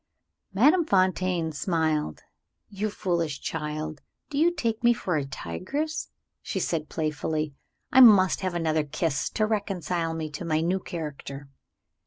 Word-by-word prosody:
Madame 295 - +5
Fontaine 185 - +1
smiled. 155 - -1 0.5
"You 210 +1 -2
foolish 170 -8 -1
child, 155 -1 -4 0.3
do 285 - -1
you 335 +3 +5
take 230 -9 -2
me 240 0 +6
for 185 -6 -2
a 145 -3 0
tigress?" 270 - -4 0.3
she - - -3
said 155 -3 -2
playfully. 155 -1 -2 0.4
"I 260 - +6
must 200 -6 +7
have 185 -2 -2
another 160 -2 +1
kiss 150 0 -1
to 215 - 0
reconcile 180 -6 -1
me 155 -2 -4
to 150 - -6
my 155 -2 +1
new 175 +4 +1
character." 145 -5 -7
170 Hz, 140 wpm, -26 LUFS, 155-200 Hz, 0.5 s, must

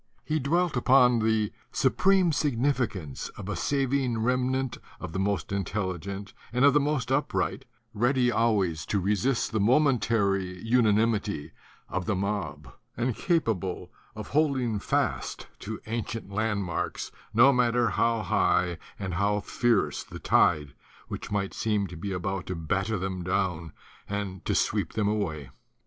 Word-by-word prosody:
He 155 0 0
dwelt 170 +4 +1
upon 125 -1 +5
the 110 -1 +1 0.2
supreme 190 -3 +3
significance 125 - -1
of 100 - -7
a 105 - -2
saving 135 +2 0
remnant 130 +1 0 0.2
of 90 - -6
the 95 - -2
most 100 -1 -1
intelligent 100 0 -3 0.2
and 125 +3 +3
of 140 - +6
the 150 - +5
most 140 -3 -1
upright, 145 +2 0 0.3
ready 125 +3 +2
always 100 -10 +1
to 100 - +1
resist 105 +6 0
the 110 - 0
momentary 105 -7 +2
unanimity 110 -6 +2 0.4
of 90 -2 -3
the 110 - +1
mob 95 -9 -3 0.2
and 120 -1 0
capable 100 - -1 0.2
of 110 -1 -7
holding 130 -7 +1
fast - - -1
to 110 +1 -6
ancient 115 -2 -4
landmarks 100 -4 -2 0.2
no 120 +6 +6
matter 120 -2 +2
how 115 +1 +1
high 90 -5 +1 0.2
and 95 -3 -4
how 100 +4 +1
fierce 115 0 +1
the - - -10
tide 75 -4 +2 0.4
which - - -6
might 100 -2 -1
seem 105 -3 0
to 90 - -8
be 95 +5 -5
about 95 0 -3
to 95 - -3
batter 95 +6 -1
them 95 0 -3
down 90 -3 -1 0.4
and 100 -3 -4
to - - 0
sweep - - 0
them 105 -2 0
away. 80 -11 -2
105 Hz, 140 wpm, -27 LUFS, 95-125 Hz, 0.4 s, of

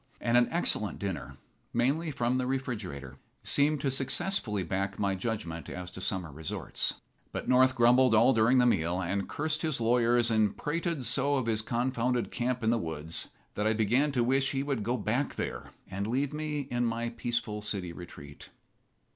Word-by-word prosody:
And 115 - +1
an 120 0 +5
excellent 135 -11 0
dinner, 70 -9 -5 0.4
mainly 140 +8 +1
from 125 -2 0
the 125 - -1
refrigerator, 100 - -4 0.3
seemed 145 0 +2
to 135 - 0
successfully 135 - -1
back 95 +3 -2
my 100 -1 +1
judgment 95 -5 -4
as 90 0 -6
to 95 - -8
summer 90 -4 -2
resorts. 80 +2 -3 0.4
But - - -5
North 130 +1 +5
grumbled 125 0 +5
all 120 +5 +6
during 115 +3 +4
the 125 - +5
meal, 90 -6 +2
and 95 +2 -2
cursed 155 +1 -1
his 155 -6 0
lawyers 120 0 +3
and 110 -2 +2
prated 165 -2 -2
so 135 +4 +2
of 130 -3 0
his 110 -1 +1
confounded 120 +1 0
camp 125 0 -1
in 110 - +3
the 120 - +2
woods 80 -2 -2 0.2
that 105 +1 0
I 110 - +3
began 120 +7 +2
to 125 -3 +2
wish 135 +3 +2
he 135 0 0
would 140 -5 -1
go 120 +4 0
back 120 +6 -1
there - - -4 0.2
and 100 +2 -3
leave 135 +5 0
me 150 -1 -2
in 120 -3 -2
my 115 0 -1
peaceful 115 -2 -3
city 95 -4 -4
retreat. 75 -5 -11
120 Hz, 180 wpm, -30 LUFS, 100-130 Hz, 0.4 s, all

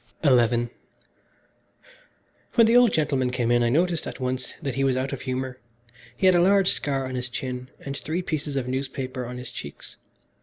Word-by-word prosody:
XI 120 -3 +4 1.9
When 230 -2 +7
the 230 +2 +4
old 245 -3 +7
gentleman 135 -5 +1
came 125 -2 0
in 120 0 +4
I 120 - +3
noticed 170 +4 +1
at - - -7
once 130 0 -3
that 135 - -3
he 135 - 0
was 130 -2 +2
out 130 +1 -2
of - - -5
humour. 130 -1 -3 0.6
He - - 0
had 185 - +7
a 175 - +4
large 195 +1 +4
scar 135 -2 -1
on 130 - -5
his 125 0 -2
chin, 125 -1 -5
and 140 0 -5
three 165 +6 -3
pieces 150 -4 -3
of 130 -2 -1
newspaper 130 -1 -3
on 125 +1 -6
his 125 -1 -6
cheeks. 70 - -9
130 Hz, 190 wpm, -25 LUFS, 125-150 Hz, 1.9 s, When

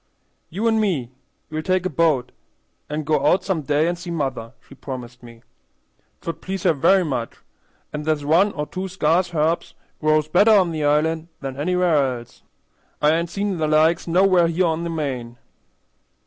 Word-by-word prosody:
"You 205 +7 -2
an' 225 -1 +2
me, 160 - -1 0.4
we'll 155 0 -2
take 185 +2 0
a - - +1
bo't 150 -6 +1 0.6
an' 150 +1 -3
go 150 -1 0
out 180 +5 +3
some 185 -5 -1
day 150 +2 +1
and 175 - 0
see 175 +1 -9
mother," 135 -8 -3
she - - -14
promised 125 -3 -8
me. 115 -1 -14 0.8
"'Twould 165 -1 -6
please 190 -1 -5
her 175 - +4
very 185 +6 +3
much, 125 -6 -3 0.6
an' 150 - -3
there's 150 -1 -1
one 175 +7 +4
or 150 - -3
two 185 +4 -5
sca'ce 180 0 +1
herbs 160 +2 0 0.2
grows 155 0 +2
better 205 +7 +5
on 185 -5 +4
the 155 -2 -3
island 155 +2 +1
than 135 -2 -5
anywhere 155 -4 +1
else. 120 0 -14 0.6
I 150 - +4
ain't 170 +1 0
seen 200 0 -2
their 155 - +1
like 155 +3 +2
nowheres 175 -1 +3
here 185 +1 +3
on 165 0 -1
the - - -3
main." 130 -7 -4
160 Hz, 175 wpm, -22 LUFS, 145-180 Hz, 0.8 s, better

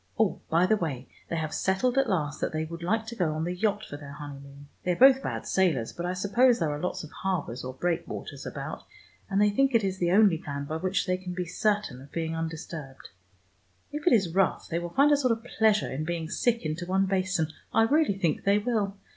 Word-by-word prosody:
Oh, 220 -3 +1
by 170 +3 +4
the 215 +3 +3
way, 140 -8 -4 0.2
they - - -2
have 155 -2 -2
settled 195 +7 +1
at 270 -3 +2
last 150 -6 -1
that - - 0
they 155 0 -2
would 170 +1 -8
like 220 +6 0
to 235 +1 -7
go 175 -7 0
on 155 +1 -2
the 175 +2 -2
yacht 210 +3 0
for 145 - -8
their 145 -1 -10
honeymoon. 140 -1 -10
They 180 - 0
are - - -7
both 265 0 +8
bad - - -4
sailors, 160 -12 +1
but 175 +1 -4
I 180 - -1
suppose 235 +7 +3
there 160 -3 0
are 145 - -3
lots 180 - -2
of 155 - -10
harbors 170 -10 -3
or 130 0 -6
breakwaters 170 +4 -3
about, - - -6 0.5
and 195 0 +1
they 210 0 +4
think 270 +4 +2
it 225 - +4
is 190 -1 -2
the 175 - +1
only 195 -4 +5
plan 140 -2 -5
by 155 +2 -3
which 185 +4 0
they 185 -1 0
can 185 -1 -6
be 180 -1 -2
certain 205 -6 -1
of 140 - -14
being 165 -1 -2
undisturbed. 160 -4 -6 0.8
If 295 +3 -5
it - - +6
is 190 -7 +2
rough, 195 0 +1
they 170 - -1
will 175 0 -5
find 280 +11 +4
a 290 - +5
sort 255 -4 +2
of 225 0 -6
pleasure 220 -3 +2
in 140 +4 -3
being 165 0 -3
sick 235 -6 +1
into 155 +3 -3
one 190 +1 +2
basin: 185 -4 0 0.2
I 225 - +4
really 275 -4 +2
think 170 -5 0
they 200 +1 +4
will. 210 -3 -1
180 Hz, 240 wpm, -28 LUFS, 160-210 Hz, 0.8 s, both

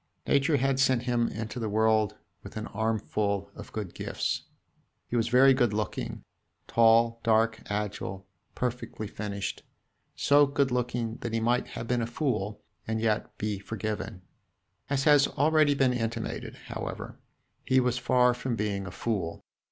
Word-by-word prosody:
Nature 140 +2 +3
had 135 0 +1
sent 130 -3 +3
him 120 -2 +1
into 110 +3 -5
the 110 -2 -2
world 110 0 +2 0.3
with - - -9
an 110 - -3
armful 105 -2 -1
of - - -10
good 105 -5 -5
gifts. - - -2 0.6
He - - -4
was 115 -1 +2
very 130 +3 +6
good 120 -5 +2
looking 105 -1 -3 0.4
tall, 115 0 +4
dark, 110 0 +2
agile, 105 -2 -3 0.3
perfectly 125 -3 -3
finished, 100 -1 -4 0.5
so 145 0 +5
good 140 -1 +1
looking 120 -2 -1
that 120 - -5
he 115 - +2
might 120 +2 +1
have 115 - -5
been 125 0 +1
a 115 - -1
fool 110 -6 -2 0.2
and 110 0 -1
yet 110 -1 -1
be 105 -2 -2
forgiven. 105 -1 -4 0.7
As 140 -1 +1
has 145 -2 +6
already 155 -1 +3
been 135 -2 +3
intimated, 115 -1 -3
however, - - -6 0.4
he 130 - +3
was 125 -1 +1
far 125 0 +4
from 125 0 -3
being 100 -2 -2
a - - -6
fool. 95 -6 -3
115 Hz, 150 wpm, -28 LUFS, 105-125 Hz, 0.7 s, very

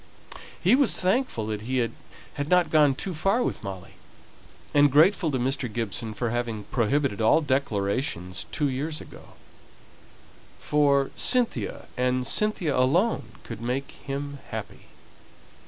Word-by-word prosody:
He - - +3
was 275 -1 +4
thankful 190 - 0
that 105 -1 -3
he 130 +4 -2
had 115 -3 +1 0.6
not 180 -1 +3
gone 150 -3 +5
too 185 +7 -4
far 195 +10 +1
with - - -3
Molly, 95 -2 -7 0.8
and 145 -1 +5
grateful 165 +4 +4
to 135 - -1
Mr. 125 -1 -1
Gibson 110 0 -3
for 120 0 -2
having 120 -3 -2
prohibited 125 -1 +1
all 110 - +5
declarations 105 - -2
two 145 - 0
years 145 +4 -3
ago; - - -13 1.2
for 140 -2 +2
Cynthia, 250 -2 0
and 125 0 +1
Cynthia 190 -7 +1
alone, 170 - +1
could 115 -2 -8
make 125 +3 -2
him 140 0 -6
happy. - - -7
135 Hz, 130 wpm, -26 LUFS, 115-155 Hz, 1.2 s, gone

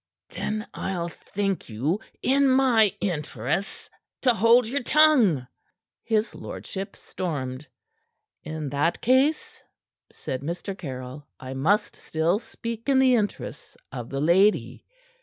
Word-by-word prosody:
"Then 215 +1 -3
I'll 175 -3 -3
thank 195 0 -3
you, 140 - -1 0.2
in 275 +1 +4
my 250 -6 +4
interests, 150 - -3 0.4
to 250 -2 +5
hold 230 +2 +5
your 275 +5 -1
tongue!" 245 - +4 0.6
his 220 -1 0
lordship 195 0 -7
stormed. 140 -6 -5 0.7
"In 155 -2 -5
that 145 +4 +1
case," 265 +6 +2 0.5
said 130 - -5
Mr. 175 +6 -4
Caryll, 130 -3 -7
"I 130 0 -7
must 185 +11 +1
still 165 +5 0
speak 230 +1 -6
in 270 - +4
the 260 -1 +5
interests 210 -4 -2
of 120 -3 -6
the 135 - -3
lady. 190 +7 +2
195 Hz, 120 wpm, -25 LUFS, 150-230 Hz, 0.7 s, to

